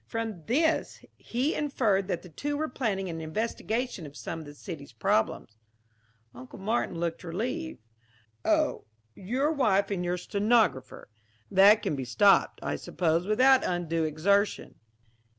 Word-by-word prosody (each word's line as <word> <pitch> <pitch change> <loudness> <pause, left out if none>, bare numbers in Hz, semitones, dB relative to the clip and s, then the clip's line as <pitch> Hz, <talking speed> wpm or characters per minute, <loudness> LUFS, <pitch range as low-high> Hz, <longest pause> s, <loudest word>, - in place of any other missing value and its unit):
From 220 -8 -4
this 320 +6 0
he 255 +6 -2
inferred 220 -10 0
that 180 -4 -3
the 180 - -12
two 290 - -3
were 310 +1 -1
planning 210 -8 -2
an 165 -2 -5
investigation 220 +2 -3
of 145 +1 -13
some 165 - -5
of 160 - -9
the 145 - -11
city's 145 - -9
problems." 110 0 -1 0.7
Uncle 125 +1 -11
Martin 200 -3 -1
looked 170 0 -3
relieved. 240 - -4 0.6
"Oh, - - +1 0.3
your 255 - -1
wife 210 -10 +2
and 180 -3 -1
your 175 0 -1
stenographer. 200 - 0 0.4
That 205 +3 +6
can - - -1
be 135 - -4
stopped, 195 - +3
I - - -2
suppose, 170 +1 -1
without 255 +5 +5
undue 165 -2 -1
exertion." 200 +7 0
195 Hz, 140 wpm, -28 LUFS, 165-235 Hz, 0.7 s, That